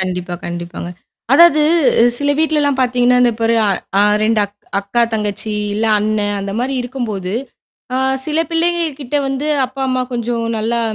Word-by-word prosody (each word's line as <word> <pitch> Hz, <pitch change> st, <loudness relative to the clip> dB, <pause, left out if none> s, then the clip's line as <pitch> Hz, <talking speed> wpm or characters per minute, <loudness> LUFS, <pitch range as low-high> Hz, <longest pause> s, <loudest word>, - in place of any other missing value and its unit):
கண்டிப்பா, 180 Hz, -1 st, -3 dB
கண்டிப்பாங்க. 175 Hz, 0 st, -6 dB, 0.4 s
அதாவது 310 Hz, 0 st, +6 dB, 0.6 s
சில 285 Hz, 0 st, 0 dB
வீட்லலாம் 300 Hz, -3 st, +1 dB
பார்த்தீங்கன்னா. 250 Hz, 0 st, +3 dB
இந்த 240 Hz, -1 st, +3 dB
பாரு 230 Hz, 0 st, +2 dB
அ -, -, +2 dB, 0.3 s
அ -, -, +5 dB, 0.2 s
2 220 Hz, -1 st, +2 dB
அக் 200 Hz, -, -10 dB, 0.3 s
அக்கா 200 Hz, +4 st, 0 dB
தங்கச்சி 210 Hz, 0 st, -3 dB, 0.2 s
இல்ல 220 Hz, -, -1 dB
அண்ணன் 210 Hz, -1 st, -1 dB
அந்த 195 Hz, 0 st, -4 dB
மாரி 260 Hz, +3 st, -1 dB
இருக்கும்போது 220 Hz, -7 st, -4 dB, 0.6 s
அ -, -, +1 dB, 0.3 s
சில 310 Hz, 0 st, -1 dB
பிள்ளைங்க 340 Hz, +1 st, +1 dB, 0.2 s
கிட்ட 275 Hz, +1 st, -3 dB
வந்து 270 Hz, +2 st, -3 dB, 0.2 s
அப்பா, 260 Hz, +2 st, -10 dB
அம்மா 255 Hz, 0 st, 0 dB
கொஞ்சம் 235 Hz, -1 st, -2 dB
நல்லா 230 Hz, +2 st, -1 dB
240 Hz, 155 wpm, -17 LUFS, 205-270 Hz, 0.6 s, அதாவது